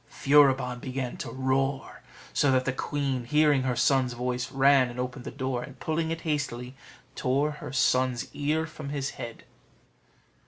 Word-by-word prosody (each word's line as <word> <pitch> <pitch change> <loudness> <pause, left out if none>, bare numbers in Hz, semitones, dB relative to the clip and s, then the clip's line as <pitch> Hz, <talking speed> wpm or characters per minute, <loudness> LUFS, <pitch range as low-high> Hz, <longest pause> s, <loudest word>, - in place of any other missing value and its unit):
Furibon 135 -3 +3
began 130 -1 -4
to - - -5
roar, 135 +1 -1 0.3
so 145 - +3
that 130 -1 +2
the 130 - 0
queen, 135 -2 -2
hearing 150 0 +3
her 130 -1 0
son's 130 -1 +2
voice, 125 +1 -3
ran 135 -1 +4
and 120 +1 -8
opened 125 0 -4
the - - -4
door, 130 -2 -3
and, 130 +1 -10
pulling 160 0 -1
it 165 0 -3
hastily, 140 -5 -3 0.4
tore 140 +4 +1
her 150 - -8
son's 130 -2 +1
ear 155 +2 0
from 155 -3 -8
his 140 -1 -2
head. 120 -3 -8
135 Hz, 160 wpm, -27 LUFS, 125-145 Hz, 0.4 s, ran